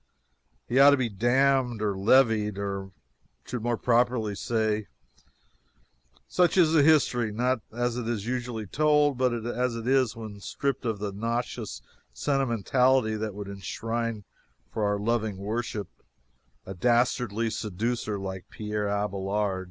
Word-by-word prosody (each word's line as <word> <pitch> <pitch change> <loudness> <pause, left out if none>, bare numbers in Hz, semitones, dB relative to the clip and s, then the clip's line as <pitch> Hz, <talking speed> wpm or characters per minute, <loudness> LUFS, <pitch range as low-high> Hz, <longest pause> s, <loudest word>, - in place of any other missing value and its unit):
He 125 - +2
ought 140 +1 +9
to 145 - +5
be 125 -3 0
dammed 125 +2 +2
or 105 -2 -1
leveed, 105 -1 +3
I 100 -1 -3 0.6
should 125 -2 -4
more 120 0 0
properly 120 -3 +1
say. 110 0 -1 1.4
Such 180 +1 +2
is 165 -3 +5
the 160 - +6
history 135 -7 +3
not 120 +2 0
as 120 +1 -1
it 120 -2 -3
is 110 -4 -2
usually 120 -3 -3
told, 150 +4 +3
but 130 -1 +3
as 120 0 -1
it 115 +1 -5
is 130 -3 +2
when 110 -3 -8
stripped 135 +6 -3
of 110 -3 -1
the 100 0 -4
nauseous 115 +1 -3 0.3
sentimentality 125 - +2
that 110 -2 -4
would 100 -1 -6
enshrine 115 +3 -4 0.5
for 110 - -1
our 100 0 +1
loving 110 -1 -1
worship 105 0 -3 0.8
a 95 - -6
dastardly 115 +1 +1
seducer 110 +1 -2
like 95 -1 -6
Pierre 105 -1 -3
Abelard. 100 -1 -1
115 Hz, 135 wpm, -27 LUFS, 105-125 Hz, 1.4 s, ought